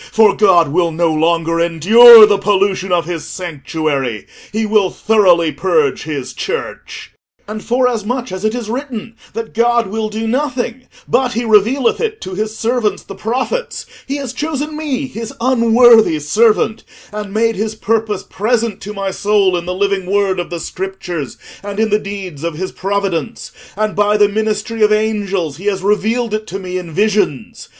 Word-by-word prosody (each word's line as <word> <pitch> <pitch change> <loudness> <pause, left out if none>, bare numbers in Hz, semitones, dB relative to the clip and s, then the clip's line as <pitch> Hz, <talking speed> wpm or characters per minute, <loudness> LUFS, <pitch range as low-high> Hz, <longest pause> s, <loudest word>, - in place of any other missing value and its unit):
For 220 -2 +4
God 180 -7 +4
will 170 +2 +1
no 165 0 0
longer 165 +1 +1
endure 215 +8 +8
the 205 -1 +1
pollution 195 -2 0
of 175 -3 +1
his 170 -1 -4
sanctuary; 150 - -4 0.3
he 220 +1 -1
will 210 -3 +2
thoroughly 180 -8 +2
purge 445 - 0
his 140 -5 -5
Church. 445 +2 -6 0.4
"And 215 0 -6
forasmuch 245 0 -1
as 185 +1 -6
it 215 +2 0
is 240 -3 -5
written 240 -2 -5 0.2
that 230 -1 -6
God 235 +1 +2
will 215 +2 -3
do 220 +1 -4
nothing 255 -1 -2 0.2
but 255 -1 +1
he 235 +2 -2
revealeth 230 - +2
it 440 -2 -2
to 185 - -7
his 215 +3 -4
servants 225 -4 -1
the - - -9
prophets, 255 - -3 0.2
he 275 - -2
has 270 -4 -5
chosen 300 +1 -4
me, 290 -3 -3
his 230 -3 -7
unworthy 235 -5 +5
servant, 215 +8 +1 0.3
and 210 -1 -6
made 225 +2 +1
his 215 +2 -3
purpose 220 -2 -1
present 225 -1 -2
to 210 +2 -7
my 195 -1 -3
soul 200 -1 +1
in 175 0 -4
the 180 - -2
living 195 -1 -1
word 195 -1 +1
of 175 - -4
the 170 -1 -5
Scriptures, 180 -6 -6 0.2
and 205 0 -6
in 220 -1 +1
the 210 - +3
deeds 195 -7 -7
of 170 -2 -3
his 185 +4 -4
providence; 200 +2 -3 0.3
and 215 0 -1
by 210 +1 +2
the 205 -1 +5
ministry 215 +2 -2
of 210 0 +4
angels 200 -8 -1
he 190 - -11
has 195 -2 -1
revealed 215 +3 0
it 215 0 -3
to 195 - -5
me 185 -1 -4
in 175 -2 -9
visions. 205 -6 -1
210 Hz, 175 wpm, -16 LUFS, 185-230 Hz, 0.4 s, endure